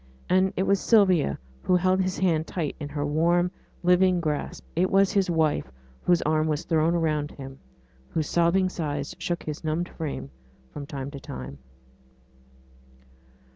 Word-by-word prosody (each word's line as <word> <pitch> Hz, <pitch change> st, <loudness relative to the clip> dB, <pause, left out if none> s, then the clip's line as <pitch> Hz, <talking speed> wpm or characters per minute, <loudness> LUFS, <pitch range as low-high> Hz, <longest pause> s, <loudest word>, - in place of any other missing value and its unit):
And 185 Hz, +1 st, +3 dB
it 190 Hz, -, +2 dB
was 200 Hz, 0 st, +2 dB
Sylvia 185 Hz, -, +3 dB, 0.2 s
who 180 Hz, -, +2 dB
held 185 Hz, +1 st, +3 dB
his 185 Hz, 0 st, -1 dB
hand 165 Hz, -4 st, +1 dB
tight 160 Hz, -6 st, -3 dB
in 145 Hz, -2 st, -5 dB
her 145 Hz, 0 st, -2 dB
warm, 170 Hz, +4 st, +2 dB, 0.3 s
living 180 Hz, 0 st, +4 dB
grasp; 150 Hz, -3 st, -3 dB
it 180 Hz, +3 st, +2 dB
was 195 Hz, 0 st, +4 dB
his 195 Hz, -3 st, +1 dB
wife 160 Hz, -, +1 dB, 0.3 s
whose 175 Hz, -1 st, +2 dB
arm 155 Hz, +1 st, +1 dB
was 155 Hz, 0 st, -1 dB
thrown 165 Hz, +1 st, +2 dB
around 155 Hz, -3 st, 0 dB
him, 135 Hz, -1 st, -10 dB, 0.5 s
whose 155 Hz, -2 st, -1 dB
sobbing 175 Hz, +2 st, +3 dB
sighs 145 Hz, -6 st, -4 dB
shook 175 Hz, -1 st, -2 dB
his 150 Hz, 0 st, -6 dB
numbed 160 Hz, +3 st, -1 dB
frame 140 Hz, -, -5 dB, 0.4 s
from 140 Hz, -1 st, -7 dB
time 140 Hz, -1 st, -5 dB
to 140 Hz, -, -8 dB
time. 65 Hz, -, -8 dB
165 Hz, 155 wpm, -26 LUFS, 150-180 Hz, 0.5 s, living